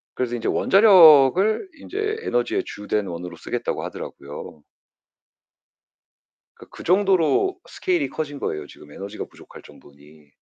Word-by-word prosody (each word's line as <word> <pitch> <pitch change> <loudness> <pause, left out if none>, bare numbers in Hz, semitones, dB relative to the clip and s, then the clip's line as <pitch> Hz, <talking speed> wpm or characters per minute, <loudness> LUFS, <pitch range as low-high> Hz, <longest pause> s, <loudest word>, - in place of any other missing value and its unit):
그래서 125 -1 -2
인제 115 - -4
원자력을 190 - +5
인제 420 +7 -4
에너지의 120 0 -1
주된 105 0 -3
원으로 90 0 -7
쓰겠다고 - - -4
하더라고요. 75 +2 -9 1.9
그러니까 - - -16
그 - - -10
정도로 190 - +2
스케일이 360 -5 -1
커진 145 -3 -5
거예요, 75 - -4
지금 75 - -16
에너지가 100 +6 -7
부족할 - - -15
정도니. 75 +1 -19
140 Hz, 335 characters per minute, -22 LUFS, -, 1.9 s, 원자력을